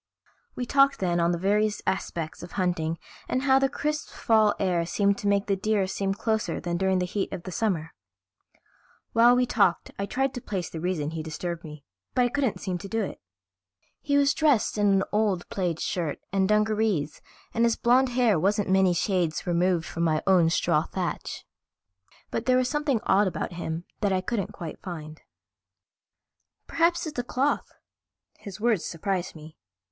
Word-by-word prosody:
We 245 - -3
talked 275 +2 +4
then 175 -2 0
on 170 0 +2
the 175 - 0
various 210 +3 +1
aspects 165 -4 -3
of 175 - -10
hunting 170 -4 -1 0.3
and 255 - 0
how 270 -1 +5
the 270 0 +2
crisp 300 +1 -3
fall 220 -2 +3
air 180 -3 +1
seemed 200 +4 +1
to 205 - -3
make 200 0 +2
the 200 - +1
deer 205 0 +1
seem 195 +1 -2
closer 220 0 -1
than 175 -1 -3
during 190 +1 +1
the 180 - 0
heat 195 +2 -3
of 170 - -6
summer. 165 -6 -1 1.2
While 235 +2 +6
we 250 0 +3
talked 200 -7 +1
I 200 - -2
tried 270 +3 0
to 245 - -6
place 190 -6 -4
the 165 - -5
reason 160 -3 -2
he 160 -1 -4
disturbed 165 +2 -5
me, 150 -3 -10 0.3
but 250 - +4
I 245 - +2
couldn't 265 -3 -1
seem 185 -3 -3
to 200 - -7
do 225 +1 0
it. - - -6 0.8
He 285 -1 +1
was 280 0 +4
dressed 290 -8 +2
in 205 -1 +2
an 195 -1 +3
old 205 -4 +1
plaid 175 -4 -2
shirt 165 -5 -2 0.2
and 190 0 +2
dungarees 210 -7 +1 0.3
and 230 - +1
his 235 -1 +3
blond 250 +2 +3
hair 240 -7 +2
wasn't 200 +2 +1
many 190 -2 +4
shades 175 -3 0
removed 175 -1 +1
from 165 - -5
my 155 -2 +1
own 180 -4 +5
straw - - +2
thatch. - - -4 0.9
But 225 - -3
there 255 0 +5
was 255 -1 +2
something 290 -5 0
odd 200 -1 +3
about 175 0 -3
him 170 0 -4
that 205 -2 +1
I 185 -1 +1
couldn't 200 0 -2
quite 165 -3 -8
find. 155 -4 -8 1.4
"Perhaps 340 +2 +1
it's 310 - -6
the 245 - 0
cloth." 265 +4 -1 0.7
His 200 0 -9
words 225 -5 +2
surprised 180 +1 -3
me. 155 0 -13
195 Hz, 180 wpm, -26 LUFS, 175-230 Hz, 1.4 s, While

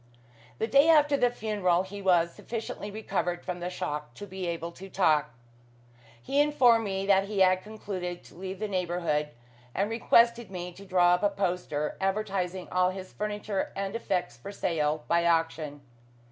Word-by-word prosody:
The - - 0
day 280 +7 +5
after 295 -3 +5
the 245 -3 +3
funeral 205 -6 0
he 200 +1 -8
was 170 -3 +3
sufficiently 225 -2 -6
recovered 180 -4 -3
from 180 -1 -4
the 175 +1 -3
shock 150 -7 -4
to 205 - -8
be 190 -2 -5
able 170 0 -3
to 195 +3 -11
talk. 155 -6 +2 0.9
He 275 - +1
informed 250 -6 +4
me 195 -1 -2
that 195 -1 +4
he 200 -1 -1
had 185 0 +5
concluded 190 -4 -6
to - - -16
leave 190 +2 -6
the 215 +2 -3
neighbourhood, 175 -5 -1 0.5
and 200 +3 0
requested 235 -1 +3
me 180 -1 -5
to 195 +3 -13
draw 180 -1 +4
up 180 - +1
a 205 - +3
poster, 180 -6 -2
advertising 190 -2 -1
all 180 0 +3
his 185 0 -7
furniture 210 -1 -3
and 195 +2 -3
effects 180 - -2
for 120 +12 -9
sale 155 -5 -1
by 170 0 +3
auction. 165 -3 0
190 Hz, 170 wpm, -28 LUFS, 175-210 Hz, 0.9 s, day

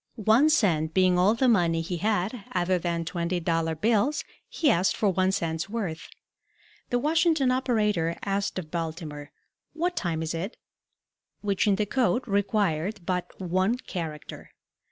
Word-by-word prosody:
One 225 +6 +4
cent 165 - +2
being 185 -1 +4
all 200 +5 +4
the 260 +3 +2
money 170 -8 +3
he 175 +2 -4
had 210 +3 -1
other 180 0 +1
than 170 -1 -2
twenty 175 +1 -2
dollar 165 -1 0
bills, 225 - +1 0.3
he 300 - +2
asked 180 +3 +1
for 210 - +2
one 185 0 +2
cent's 165 -1 -2
worth. 195 -8 -4 0.8
The 245 - +1
Washington 315 -1 +2
operator 210 -10 +1
asked 200 0 -1
of 160 -4 -6
Baltimore, 160 -3 -5 0.4
"What 350 +3 -1
time 165 -3 -2
is 160 - -3
it?" 180 +7 -4 0.8
which 200 0 0
in 200 - +4
the 210 +1 0
code 250 +2 0
required 200 -2 0
but 180 -1 -3
one 185 +5 +1
character. 165 - -7
190 Hz, 150 wpm, -26 LUFS, 170-220 Hz, 0.8 s, One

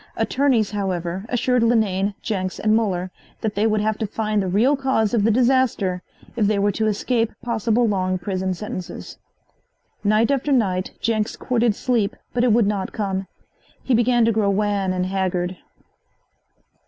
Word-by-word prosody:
Attorneys, 255 -7 +1
however, 185 -2 -3
assured 250 0 +1
Linane, 205 -4 +1
Jenks 185 -4 -2
and 215 0 +2
Muller 185 -5 -1 0.3
that 220 -3 -1
they 210 +2 +1
would 215 -1 +1
have 215 0 -1
to 220 - -1
find 215 0 -1
the 190 - -2
real 225 +10 +3
cause 265 -6 0
of 225 -4 +2
the 220 - +3
disaster 235 -6 +2 0.3
if 220 -4 +2
they 210 0 +1
were 200 +1 +2
to 220 +2 -1
escape 225 +2 0
possible 230 0 +1
long 185 -3 0
prison 185 0 -2
sentences. 185 -3 -7 0.8
Night 215 +4 +3
after 280 +1 0
night 190 -8 +1
Jenks 220 -2 0
courted 235 -3 0
sleep, 235 -2 0 0.2
but 245 - +1
it 245 - +4
would 225 0 +4
not 200 -2 -2
come. 195 -2 -2 0.6
He 265 - 0
began 240 0 +3
to 230 - +3
grow 210 -2 +1
wan 200 -1 0
and 185 0 -1
haggard. 185 -1 -1
215 Hz, 165 wpm, -22 LUFS, 190-230 Hz, 0.8 s, it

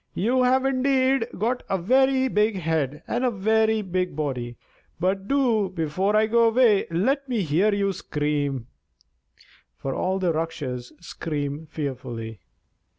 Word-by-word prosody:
you 245 +7 +1
have 260 +1 +3
indeed 265 -2 +2
got 240 +5 0
a 195 - +1
very 265 +7 +3
big 215 -2 +1
head 155 -4 -1
and 240 +2 -1
a 255 - +3
very 220 +1 +1
big 185 -3 -2
body; 125 -6 -3 0.4
but 190 +2 -1
do, 240 -8 +2
before 185 +4 -1
I 215 +1 +4
go 230 +1 +4
away, 225 -3 +4
let 265 - 0
me 230 -5 0
hear 175 +7 +2
you 200 -1 0
scream," 145 -6 -2 1.1
for 135 - -4
all 190 +6 -1
Rakshas 160 -8 -2
scream 150 -2 -4
fearfully. 120 -7 -5
190 Hz, 135 wpm, -24 LUFS, 150-235 Hz, 1.1 s, I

